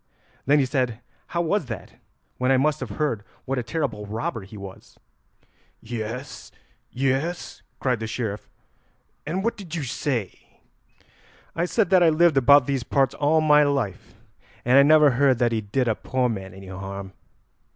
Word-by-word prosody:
Then 145 Hz, +2 st, +5 dB
he 140 Hz, -, +3 dB
said 125 Hz, -4 st, -1 dB, 0.3 s
how 170 Hz, -, -1 dB
was 170 Hz, -2 st, 0 dB
that 110 Hz, -6 st, -7 dB, 0.5 s
when 125 Hz, +1 st, +2 dB
I 135 Hz, -, +5 dB
must 150 Hz, +3 st, +1 dB
have -, -, -5 dB
heard 145 Hz, -9 st, -1 dB, 0.2 s
what 135 Hz, 0 st, -1 dB
a -, -, -1 dB
terrible 120 Hz, -6 st, -3 dB
robber 110 Hz, +1 st, -3 dB
he 100 Hz, +3 st, -11 dB
was." 100 Hz, -1 st, -11 dB, 0.8 s
"Yes, 115 Hz, +3 st, -6 dB, 0.4 s
yes," 135 Hz, +7 st, -2 dB, 0.2 s
cried 125 Hz, -4 st, 0 dB
the 110 Hz, -, -4 dB
Sheriff, 110 Hz, -3 st, -4 dB, 0.8 s
"and 185 Hz, +5 st, -2 dB
what 230 Hz, -, -1 dB
did 175 Hz, -5 st, -7 dB
you 160 Hz, -, -3 dB
say." 125 Hz, -5 st, -4 dB, 0.9 s
"I 170 Hz, -, 0 dB
said 200 Hz, +1 st, 0 dB
that 185 Hz, -1 st, +6 dB
I -, -, +6 dB
had 160 Hz, -2 st, +4 dB
lived 170 Hz, -3 st, +4 dB
about 140 Hz, +1 st, +6 dB
these 135 Hz, -1 st, -1 dB
parts 135 Hz, +2 st, +1 dB
all 155 Hz, +2 st, +2 dB
my 150 Hz, -1 st, +5 dB
life 140 Hz, -10 st, -1 dB, 0.5 s
and 125 Hz, +3 st, +6 dB
I -, -, +9 dB
never 150 Hz, 0 st, +6 dB
heard 130 Hz, 0 st, +3 dB
that 120 Hz, 0 st, +2 dB
he 110 Hz, -1 st, 0 dB
did 115 Hz, +5 st, -1 dB
a 115 Hz, -, +3 dB
poor 125 Hz, +3 st, -1 dB
man 95 Hz, -5 st, -5 dB
any 95 Hz, 0 st, -11 dB
harm. 95 Hz, 0 st, -7 dB
130 Hz, 170 wpm, -24 LUFS, 110-150 Hz, 0.9 s, I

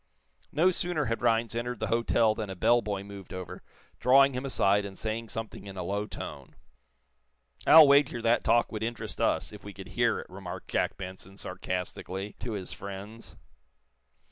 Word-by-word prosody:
No 170 Hz, +6 st, +4 dB
sooner 175 Hz, -4 st, +1 dB
had 115 Hz, -1 st, -2 dB
Rhinds 115 Hz, -2 st, +2 dB
entered 120 Hz, 0 st, -3 dB
the 110 Hz, -, -1 dB
hotel 115 Hz, -1 st, +3 dB
than 110 Hz, -2 st, -5 dB
a 95 Hz, -, -5 dB
bell 120 Hz, +6 st, +4 dB
boy 100 Hz, -2 st, -3 dB
moved 100 Hz, -2 st, -10 dB
over, 95 Hz, -1 st, -7 dB, 0.4 s
drawing 135 Hz, +2 st, +6 dB
him 130 Hz, +2 st, -3 dB
aside 100 Hz, -5 st, +2 dB
and 100 Hz, -1 st, -8 dB
saying 110 Hz, +1 st, -3 dB
something 110 Hz, -2 st, -6 dB
in 95 Hz, -1 st, -8 dB
a 90 Hz, -, -3 dB
low 100 Hz, +3 st, -2 dB
tone. -, -, -8 dB, 1.1 s
"I'll 160 Hz, -1 st, +10 dB
wager 140 Hz, -3 st, +4 dB
that 115 Hz, +1 st, +2 dB
talk 120 Hz, 0 st, +3 dB
would 110 Hz, -2 st, -4 dB
interest 115 Hz, +1 st, -4 dB
us, -, -, +1 dB
if -, -, -11 dB
we -, -, -8 dB
could -, -, -10 dB
hear -, -, +1 dB
it," -, -, -6 dB
remarked -, -, -8 dB
Jack -, -, 0 dB
Benson, 95 Hz, +1 st, -9 dB
sarcastically, 95 Hz, +2 st, -4 dB
to 120 Hz, -, -4 dB
his 95 Hz, -3 st, -5 dB
friends. 100 Hz, +3 st, -9 dB
110 Hz, 175 wpm, -29 LUFS, 100-120 Hz, 1.1 s, I'll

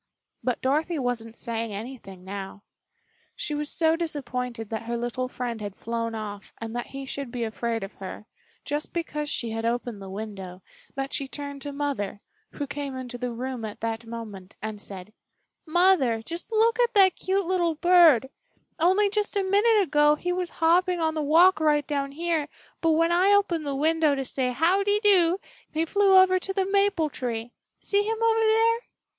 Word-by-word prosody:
But 250 Hz, -2 st, -1 dB
Dorothy 310 Hz, +6 st, +1 dB
wasn't 235 Hz, -4 st, -3 dB
saying 230 Hz, -2 st, -3 dB
anything 200 Hz, -4 st, -8 dB
now. 195 Hz, +1 st, -7 dB, 0.7 s
She 305 Hz, -, -3 dB
was 295 Hz, 0 st, -2 dB
so 320 Hz, -1 st, +3 dB
disappointed 250 Hz, -8 st, -4 dB
that 220 Hz, -, -2 dB
her 235 Hz, +1 st, -2 dB
little 240 Hz, +2 st, -2 dB
friend 245 Hz, -3 st, -4 dB
had 205 Hz, -2 st, -5 dB
flown 230 Hz, 0 st, -3 dB
off 205 Hz, -2 st, -7 dB
and 225 Hz, 0 st, -6 dB
that 240 Hz, -, -3 dB
he 275 Hz, 0 st, -7 dB
should 270 Hz, -1 st, -5 dB
be 240 Hz, -1 st, -3 dB
afraid 225 Hz, 0 st, -2 dB
of 195 Hz, -, -7 dB
her, 195 Hz, +2 st, -8 dB, 0.4 s
just 295 Hz, +2 st, -3 dB
because 300 Hz, -3 st, -3 dB
she 235 Hz, -5 st, -2 dB
had 225 Hz, 0 st, -3 dB
opened 235 Hz, -2 st, -2 dB
the 195 Hz, -, -8 dB
window, 195 Hz, -3 st, -7 dB, 0.3 s
that 270 Hz, 0 st, -3 dB
she 275 Hz, -, -2 dB
turned 285 Hz, 0 st, -7 dB
to 285 Hz, -, -5 dB
Mother, 280 Hz, -9 st, -3 dB, 0.3 s
who 290 Hz, -, -3 dB
came 280 Hz, -1 st, -5 dB
into 250 Hz, -1 st, -6 dB
the 250 Hz, 0 st, -2 dB
room 250 Hz, 0 st, -4 dB
at 215 Hz, -1 st, -6 dB
that 225 Hz, 0 st, -3 dB
moment, 215 Hz, -5 st, -8 dB
and 215 Hz, -1 st, -5 dB
said: 195 Hz, +1 st, -8 dB, 0.5 s
"Mother, 315 Hz, -10 st, +3 dB
just 335 Hz, -, -7 dB
look 450 Hz, +1 st, +3 dB
at 480 Hz, -2 st, +2 dB
that 380 Hz, -3 st, +6 dB
cute 385 Hz, 0 st, 0 dB
little 345 Hz, -2 st, +1 dB
bird; 330 Hz, -7 st, +6 dB, 0.5 s
only 375 Hz, +5 st, +4 dB
just 420 Hz, +1 st, -1 dB
a 400 Hz, -, +2 dB
minute 410 Hz, +2 st, +4 dB
ago 295 Hz, -2 st, +4 dB
he 355 Hz, +3 st, -2 dB
was 360 Hz, -1 st, -2 dB
hopping 355 Hz, +2 st, +2 dB
on 320 Hz, -1 st, +1 dB
the 310 Hz, -, -2 dB
walk 325 Hz, +4 st, +5 dB
right 300 Hz, -2 st, +2 dB
down 280 Hz, -2 st, -2 dB
here, 325 Hz, -1 st, -1 dB, 0.3 s
but 325 Hz, -1 st, +3 dB
when 330 Hz, +2 st, +3 dB
I 365 Hz, +3 st, +4 dB
opened 345 Hz, -7 st, +2 dB
the 280 Hz, -, -1 dB
window 310 Hz, 0 st, +2 dB
to 270 Hz, -1 st, -3 dB
say 255 Hz, 0 st, -1 dB
'How 335 Hz, +10 st, +2 dB
de 410 Hz, +1 st, +2 dB
doo!' 380 Hz, -4 st, +4 dB, 0.3 s
he 320 Hz, +1 st, 0 dB
flew 395 Hz, +2 st, +4 dB
over 375 Hz, 0 st, +6 dB
to 385 Hz, +1 st, -4 dB
the 385 Hz, -1 st, +1 dB
maple 395 Hz, -5 st, +2 dB
tree. 235 Hz, -2 st, -4 dB, 0.3 s
See 405 Hz, 0 st, +2 dB
him 440 Hz, +2 st, -1 dB
over 455 Hz, 0 st, +3 dB
there?" 450 Hz, +1 st, +3 dB
290 Hz, 185 wpm, -26 LUFS, 230-355 Hz, 0.7 s, that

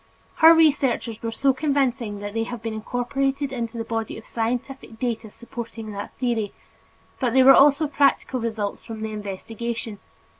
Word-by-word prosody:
Her 320 Hz, 0 st, +9 dB
researches 275 Hz, -8 st, +2 dB
were 230 Hz, -, -2 dB
so 270 Hz, +4 st, +2 dB
convincing 260 Hz, -7 st, 0 dB
that 205 Hz, 0 st, -5 dB
they 225 Hz, 0 st, -1 dB
have 240 Hz, -2 st, -7 dB
been 225 Hz, -1 st, -3 dB
incorporated 270 Hz, +5 st, -2 dB
into 235 Hz, -2 st, -4 dB
the 225 Hz, -, -2 dB
body 225 Hz, -1 st, -3 dB
of 220 Hz, -, -11 dB
scientific 240 Hz, +1 st, -4 dB
data 230 Hz, -2 st, -3 dB
supporting 230 Hz, -1 st, -8 dB
that 205 Hz, 0 st, -6 dB
theory, 235 Hz, -5 st, -1 dB, 0.7 s
but 245 Hz, -3 st, 0 dB
there 260 Hz, 0 st, +6 dB
were 270 Hz, -, +10 dB
also 290 Hz, +3 st, +6 dB
practical 280 Hz, -3 st, +2 dB
results 220 Hz, -3 st, -3 dB
from 225 Hz, -2 st, -8 dB
the 220 Hz, 0 st, -3 dB
investigation. 215 Hz, +2 st, -5 dB
235 Hz, 160 wpm, -24 LUFS, 220-270 Hz, 0.7 s, were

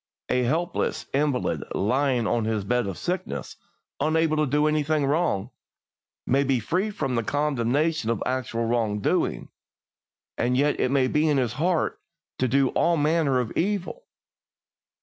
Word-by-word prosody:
A 125 Hz, -, +2 dB
helpless 165 Hz, +8 st, -1 dB
invalid 140 Hz, -2 st, 0 dB
lying 125 Hz, +3 st, +1 dB
on 115 Hz, 0 st, 0 dB
his 110 Hz, -2 st, -1 dB
bed 120 Hz, +2 st, 0 dB
of 95 Hz, -, -5 dB
sickness, 170 Hz, -, -4 dB, 0.4 s
unable 155 Hz, +1 st, +2 dB
to 155 Hz, -1 st, +2 dB
do 150 Hz, +3 st, +2 dB
anything 155 Hz, -1 st, +1 dB
wrong, 135 Hz, -, 0 dB, 0.7 s
may 135 Hz, +2 st, +2 dB
be 135 Hz, -2 st, +1 dB
free 180 Hz, -, -1 dB
from 140 Hz, -10 st, -3 dB
the 115 Hz, -, +1 dB
condemnation 145 Hz, +1 st, 0 dB
of 115 Hz, -3 st, -1 dB
actual 120 Hz, -3 st, -2 dB
wrong 115 Hz, -3 st, 0 dB
doing, -, -, 0 dB, 0.9 s
and 125 Hz, +1 st, +1 dB
yet 145 Hz, +2 st, +2 dB
it -, -, +2 dB
may 135 Hz, -1 st, +3 dB
be 150 Hz, +3 st, +2 dB
in 145 Hz, -, +2 dB
his 125 Hz, -4 st, 0 dB
heart 170 Hz, +5 st, 0 dB, 0.4 s
to 130 Hz, -, +2 dB
do 135 Hz, +1 st, +3 dB
all 170 Hz, -1 st, +2 dB
manner 150 Hz, -3 st, +2 dB
of 120 Hz, -2 st, -2 dB
evil. 205 Hz, -, -2 dB
135 Hz, 150 wpm, -25 LUFS, 120-155 Hz, 0.9 s, may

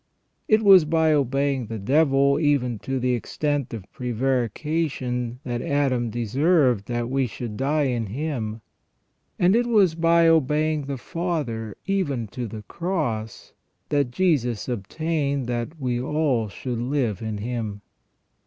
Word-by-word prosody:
It 215 Hz, 0 st, +4 dB
was 195 Hz, -4 st, +8 dB
by 160 Hz, 0 st, +2 dB
obeying 135 Hz, -2 st, 0 dB
the 115 Hz, -, -5 dB
devil 140 Hz, +5 st, +3 dB
even 135 Hz, -7 st, +1 dB
to 135 Hz, +4 st, -3 dB
the 125 Hz, 0 st, +1 dB
extent 145 Hz, +2 st, -2 dB
of 110 Hz, -5 st, -6 dB
prevarication 125 Hz, +1 st, -1 dB
that 120 Hz, -2 st, -3 dB
Adam 130 Hz, -4 st, 0 dB
deserved 125 Hz, -, +2 dB
that 120 Hz, -1 st, -2 dB
we 135 Hz, 0 st, 0 dB
should 115 Hz, 0 st, -6 dB
die 145 Hz, +5 st, +1 dB
in 120 Hz, -5 st, -1 dB
him; 115 Hz, -3 st, -4 dB, 0.8 s
and 180 Hz, +3 st, +4 dB
it 240 Hz, +1 st, +2 dB
was 205 Hz, -8 st, +4 dB
by 165 Hz, 0 st, +4 dB
obeying 155 Hz, -1 st, +2 dB
the 140 Hz, -1 st, -3 dB
Father 130 Hz, -, -3 dB
even 165 Hz, -12 st, -1 dB
to 120 Hz, +2 st, -5 dB
the 105 Hz, 0 st, -8 dB
Cross 120 Hz, -, -3 dB, 0.4 s
that 145 Hz, -3 st, +1 dB
Jesus 125 Hz, -, 0 dB
obtained 140 Hz, +5 st, -2 dB
that 120 Hz, +6 st, -4 dB
we 125 Hz, -3 st, -1 dB
all 130 Hz, -6 st, 0 dB
should 120 Hz, +3 st, -5 dB
live 120 Hz, -5 st, -1 dB
in 110 Hz, -2 st, -3 dB
Him. 110 Hz, -2 st, -4 dB
135 Hz, 135 wpm, -24 LUFS, 120-155 Hz, 0.8 s, was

